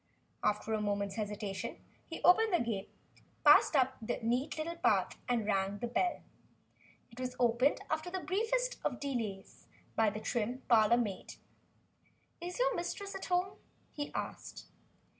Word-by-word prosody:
After 210 +1 0
a 215 - 0
moment's 200 -1 -1
hesitation, 205 -2 -4 0.3
he 330 - -7
opened 435 +5 +6
the 350 - +3
gate, 215 -4 -2 0.6
passed - - +7
up 265 -1 +3
the 220 - -2
neat 245 +7 0
little 335 +2 -3
path - - +2
and 235 -3 +1
rang 195 -1 0
the 240 - -3
bell. 350 +9 0 0.9
It 235 - -13
was 255 -1 -3
opened 245 +3 +3
after 315 +3 -2
the 375 +1 -3
briefest 455 +7 0
of 250 - -1
delays 225 -9 -4 0.3
by 220 -1 +4
the 210 +1 -5
trim 240 +3 -2
parlor 230 0 +5
maid. 210 -6 -3 1.1
"Is 355 +1 -5
your - - +2
mistress 395 +3 -4
at - - -5
home?" 360 +1 0 0.4
he 290 -1 -4
asked. - - -5
245 Hz, 150 wpm, -33 LUFS, 215-345 Hz, 1.1 s, passed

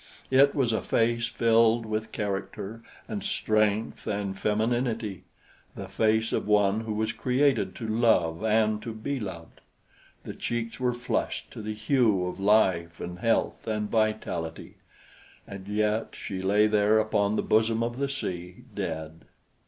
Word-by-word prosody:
It 140 +2 +5
was 125 -5 +1
a 110 - 0
face 115 0 +1
filled 115 0 +3
with 110 0 -3
character 105 +1 -4 0.3
and - - -4
strength 110 0 0
and 100 -2 -2
femininity 110 0 -1 0.5
the - - -6
face 110 0 +1
of - - -1
one 105 0 +3
who 110 -1 -4
was 110 +1 0
created 125 -6 +1
to 115 - -5
love 110 -7 +2
and 110 -1 +2
to 115 -1 -6
be 135 +5 -3
loved. 90 -6 -8 0.6
The - - -6
cheeks 115 -1 -4
were 125 -1 0
flushed 120 +1 -2
to - - -8
the 110 0 -4
hue 110 -4 +2
of 90 +1 -5
life 95 -5 +2
and 90 0 -6
health 115 +1 0
and 105 -1 -2
vitality, 110 -7 -2 0.7
and 100 -1 -9
yet 105 +2 0
she 95 -2 -5
lay 100 +3 +3
there 105 0 +3
upon 105 -1 +1
the - - 0
bosom 110 +1 +2
of 120 +2 -3
the 140 0 0
sea, 90 -10 -5
dead. 80 0 -5
110 Hz, 150 wpm, -27 LUFS, 100-115 Hz, 0.7 s, It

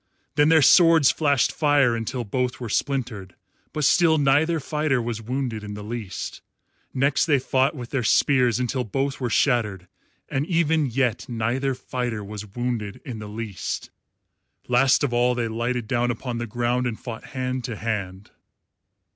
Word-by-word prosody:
Then 150 +1 +4
their 160 -2 +5
swords 165 -2 +6
flashed 145 -4 +2
fire 145 -5 +3
until 115 +2 -3
both 125 +3 -2
were 120 -3 -5
splintered, 115 -9 -2 0.4
but 150 -2 -1
still 165 +1 +4
neither 150 +4 +3
fighter 150 -2 0
was 115 -1 -3
wounded 120 -2 -3
in 105 0 -6
the 105 - -7
least. 110 -3 -6 0.5
Next 140 +4 +1
they 145 -3 +4
fought 130 +1 +1
with 125 -3 -8
their 135 - 0
spears 125 0 +3
until 125 +1 -1
both 135 +5 -2
were 125 -2 -2
shattered, 105 -7 +1 0.4
and 140 +3 -2
even 160 -4 +2
yet 125 -2 -1
neither 125 +4 -1
fighter 120 -4 -4
was 105 +1 -7
wounded 110 -1 -4
in 120 -4 -6
the 105 -1 -7
least. 105 -3 -5 0.8
Last 130 +3 +3
of 135 -4 0
all 125 +1 +2
they 120 -1 -1
lighted 120 +1 -2
down 120 0 0
upon 120 0 -3
the 120 - -4
ground 120 +3 0
and 115 -3 -4
fought 115 -3 -7
hand 130 0 -2
to 115 - -4
hand. 100 -3 -4
125 Hz, 165 wpm, -24 LUFS, 115-135 Hz, 0.8 s, swords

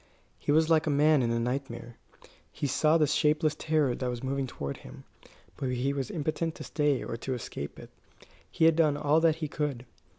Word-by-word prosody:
He - - -1
was 155 +1 +4
like 160 -1 +3
a - - +3
man 150 0 +4
in 120 - 0
a 115 0 0
nightmare. 120 -1 -4 0.6
He - - -4
saw 155 +4 +3
the 155 - +4
shapeless 150 +1 +2
terror 150 -5 +1
that 125 0 -3
was 120 0 -5
moving 135 0 -1
toward 70 - -5
him, - - -12 0.5
but 130 - -2
he 125 +2 0
was 135 -3 -3
impotent 160 +1 -2
to - - -8
stay 145 -3 0
or - - -4
to 130 +2 -3
escape 75 - -6
it. - - -12 0.6
He 160 - +2
had 165 -1 +6
done 155 -3 +3
all 150 +2 +3
that 165 -1 +3
he 160 -1 -4
could. 140 -4 -3
145 Hz, 205 wpm, -29 LUFS, 125-155 Hz, 0.6 s, had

